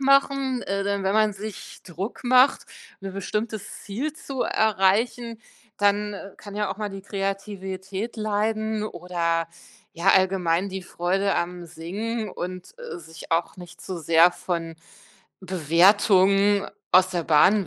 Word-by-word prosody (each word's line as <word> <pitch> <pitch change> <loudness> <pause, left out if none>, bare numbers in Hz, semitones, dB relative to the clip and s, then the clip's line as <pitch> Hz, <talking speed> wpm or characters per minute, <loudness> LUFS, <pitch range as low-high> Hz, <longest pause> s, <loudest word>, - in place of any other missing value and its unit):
machen, 275 -1 +3
äh, 195 0 -2
denn 200 0 -1
wenn 190 +1 +1
man 215 -1 +3
sich 210 +1 -8
Druck 185 +6 -6
macht, 255 +2 +5 0.4
'n 195 -1 -5
bestimmtes 210 +2 -4
Ziel 255 +10 -3
zu 275 -4 -4
erreichen, 220 +3 +1 0.4
dann 205 0 +1 0.2
kann 205 -1 -10
ja 210 -2 -1
auch - - -4
mal 210 -1 -3
die 195 -1 -8
Kreativität 195 +1 -4
leiden 215 0 -1
oder 170 -3 -1 0.4
ja 170 +3 -1
allgemein 185 -1 +2
die 190 0 -5
Freude 190 +3 0
am 175 0 -3
Singen 200 +7 -4
und, 180 - -6
äh, 480 -6 -7
sich 165 - -12
auch 170 +2 0
nicht 175 -1 -12
zu 185 -2 -5
sehr 165 +2 +5
von 170 -2 -4 0.6
Bewertungen 195 +3 +4 0.2
aus 185 0 +6
der 175 -2 -1
Bahn 185 +6 +5
195 Hz, 135 wpm, -25 LUFS, 180-215 Hz, 0.6 s, aus